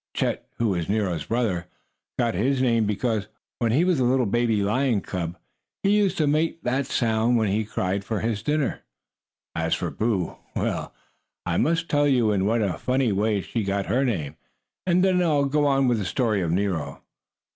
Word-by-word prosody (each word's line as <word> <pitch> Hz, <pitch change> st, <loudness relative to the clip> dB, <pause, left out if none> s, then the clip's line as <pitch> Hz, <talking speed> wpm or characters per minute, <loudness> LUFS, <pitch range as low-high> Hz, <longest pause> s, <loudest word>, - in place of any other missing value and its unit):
Chet, -, -, -1 dB
who 115 Hz, -2 st, +1 dB
was 85 Hz, -4 st, -2 dB
Nero's 100 Hz, -7 st, 0 dB
brother, 105 Hz, -7 st, -1 dB, 0.5 s
got 115 Hz, -1 st, +1 dB
his 130 Hz, +9 st, +1 dB
name 115 Hz, -4 st, +2 dB
because, 110 Hz, 0 st, -1 dB, 0.3 s
when 115 Hz, -2 st, +1 dB
he 145 Hz, +9 st, +3 dB
was 180 Hz, -6 st, +2 dB
a -, -, +2 dB
little 125 Hz, +1 st, +2 dB
baby 115 Hz, -1 st, +1 dB
lion 120 Hz, +2 st, +1 dB
cub, 90 Hz, -2 st, -4 dB, 0.5 s
he 200 Hz, +1 st, +4 dB
used 200 Hz, -3 st, +2 dB
to 155 Hz, -, +2 dB
make 155 Hz, +3 st, +1 dB
that 130 Hz, +2 st, 0 dB
sound 115 Hz, -1 st, +1 dB
when 110 Hz, -3 st, +1 dB
he 105 Hz, +3 st, +1 dB
cried 100 Hz, -2 st, -2 dB
for 110 Hz, 0 st, -3 dB
his 110 Hz, -2 st, -1 dB
dinner. 150 Hz, +3 st, 0 dB, 0.7 s
As 80 Hz, 0 st, 0 dB
for -, -, -3 dB
Boo 105 Hz, -6 st, -1 dB, 0.2 s
well, -, -, -2 dB, 0.5 s
I -, -, 0 dB
must 165 Hz, +1 st, +1 dB
tell 145 Hz, -1 st, +2 dB
you 125 Hz, -6 st, +3 dB
in 100 Hz, -1 st, +1 dB
what 115 Hz, 0 st, +2 dB
a 95 Hz, -4 st, -2 dB
funny 130 Hz, -2 st, +1 dB
way 105 Hz, +1 st, +1 dB
she 115 Hz, +3 st, -3 dB
got 100 Hz, 0 st, -1 dB
her 130 Hz, +3 st, +1 dB
name, 80 Hz, -, -2 dB, 0.5 s
and 180 Hz, +1 st, +3 dB
then 185 Hz, -1 st, +3 dB
I'll 150 Hz, -5 st, +2 dB
go 145 Hz, +1 st, +2 dB
on 135 Hz, -1 st, +3 dB
with 120 Hz, -3 st, +2 dB
the 100 Hz, -, -3 dB
story 110 Hz, -1 st, 0 dB
of 85 Hz, -, -1 dB
Nero. 85 Hz, -6 st, -2 dB
115 Hz, 190 wpm, -25 LUFS, 100-135 Hz, 0.7 s, he